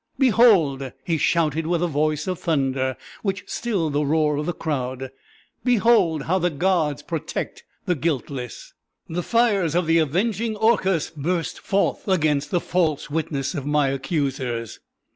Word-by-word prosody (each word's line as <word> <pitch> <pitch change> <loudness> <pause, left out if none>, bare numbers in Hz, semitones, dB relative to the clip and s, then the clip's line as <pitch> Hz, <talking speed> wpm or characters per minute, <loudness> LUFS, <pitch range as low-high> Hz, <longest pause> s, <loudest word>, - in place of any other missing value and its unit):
"Behold!" 190 - +4
he 160 +2 0
shouted 160 -1 +1
with 175 0 +1
a - - +2
voice 150 -1 0
of 185 -2 -3
thunder, 135 -4 0 0.2
which 195 -2 -2
stilled 190 -11 -1
the 145 +1 +1
roar 150 0 +2
of 150 - -3
the - - +1
crowd: 130 -5 -3 0.5
"behold 225 - +3
how 185 +6 +1
the 175 0 +1
gods 160 -3 0
protect - - -4 0.2
the 180 - +2
guiltless! 140 -5 -4 0.3
The 175 +2 -2
fires 200 -7 +2
of 175 0 +2
the 165 +1 +4
avenging 215 - 0
Orcus 195 -6 +2
burst 165 +3 -2
forth 200 +1 0
against 150 -6 +1
the 175 - +1
false 160 -5 -1
witness 150 -2 -2
of 145 -4 -4
my 145 -2 +2
accusers!" 135 -5 -2
160 Hz, 145 wpm, -23 LUFS, 145-185 Hz, 0.5 s, Behold